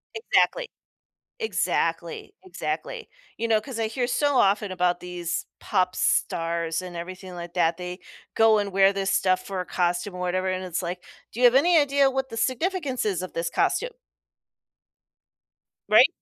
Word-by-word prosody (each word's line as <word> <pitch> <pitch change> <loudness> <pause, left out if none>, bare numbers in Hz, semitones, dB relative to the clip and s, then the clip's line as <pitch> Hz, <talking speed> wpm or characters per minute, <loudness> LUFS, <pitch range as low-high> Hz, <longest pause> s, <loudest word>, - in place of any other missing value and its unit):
Exactly. 470 +2 +1 0.7
Exactly, 440 -2 -1
exactly. 455 +5 -5 0.3
You 230 - -2
know, 220 -1 +4
'cause 230 +3 -8
I 225 -1 0
hear 245 +2 -2
so 285 +3 +1
often 200 -1 +2
about 180 -1 0
these 175 -1 -4
pop 185 -2 0
stars 165 0 0
and 180 -1 -8
everything 185 +2 -7
like 170 0 -8
that, 170 -2 +2
they 180 +1 -7 0.4
go 225 -1 +5
and 205 -1 -1
wear 195 +1 +4
this 195 -1 -1
stuff 185 -1 +2
for 195 -1 -4
a 180 - -3
costume 180 +2 -1
or - - -7
whatever, 185 +1 -1
and 185 0 -2
it's 180 0 -3
like, 180 0 -5 0.3
"Do 240 - -5
you - - +2
have 245 +1 +6
any 335 +5 +5
idea 280 -2 +4
what 265 0 -2
the 230 - -7
significance 270 0 -1
is 190 -4 0
of 185 - -7
this 170 0 -2
costume?" - - 0 2.0
Right? - - +8
195 Hz, 165 wpm, -25 LUFS, 180-260 Hz, 2.0 s, Right